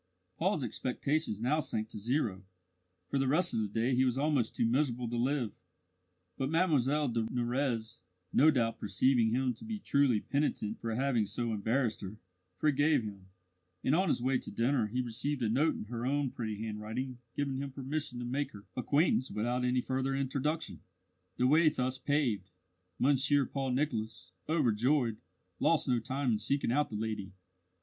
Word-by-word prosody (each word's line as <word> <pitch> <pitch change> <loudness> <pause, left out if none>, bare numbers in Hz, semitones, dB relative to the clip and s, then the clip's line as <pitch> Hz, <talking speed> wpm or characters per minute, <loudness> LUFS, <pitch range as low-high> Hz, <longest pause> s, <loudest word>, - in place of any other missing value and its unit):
Paul's 165 -4 +1
expectations 130 -2 -1
now 140 +6 +2
sank 110 -7 -2
to 105 - -7
zero; 110 -4 -1 0.7
for 140 - +1
the 135 - +1
rest 170 +6 +2
of - - +1
the 110 - 0
day 115 +5 0
he 130 +1 +4
was 125 -1 +1
almost 140 -5 +1
too - - +2
miserable 125 0 +1
to 120 - -3
live. 125 -2 0 0.9
But 135 0 0
Mlle 150 -4 +2
de 115 -1 0
Nurrez, 120 -2 -1 0.3
no 155 - +6
doubt 115 -6 +1
perceiving 115 +4 +2
him 125 +2 +1
to - - -13
be 225 -1 -4
truly 140 - +2
penitent 140 -5 -1
for 115 -1 -3
having 125 -4 +1
so 115 +3 -2
embarrassed 115 +3 0
her, 100 +2 -7 0.4
forgave 145 -1 +3
him, 100 -3 -8 0.6
and 130 - +2
on 185 +4 +3
his 125 - +1
way 130 0 +2
to - - -8
dinner 120 -1 +1
he 125 +4 -1
received 125 +3 -2
a 110 - +1
note 145 +8 +2
in - - -5
her 115 +2 -5
own 140 0 0
pretty 110 -3 -4
handwriting 110 +4 -4 0.2
giving 140 -2 -1
him 140 0 -3
permission 135 0 -4
to 120 - -4
make 140 +4 -2
her 100 0 -11
acquaintance 140 +1 +2
without 120 +4 -1
any 125 0 +2
further 130 +1 -1
introduction. 140 +4 -2 0.6
The 125 - +2
way 155 +4 +6
thus 130 -2 -2
paved, 125 -9 0 0.5
Monsieur 140 +1 +3
Paul 135 +1 -3
Nicholas, 110 - -2 0.2
overjoyed, 125 -4 +2 0.4
lost - - +2
no 125 -2 +2
time 130 +2 -1
in 110 - +2
seeking 130 +3 +1
out 145 +3 +2
the 110 - -6
lady. 105 -3 -3
130 Hz, 175 wpm, -32 LUFS, 115-145 Hz, 0.9 s, no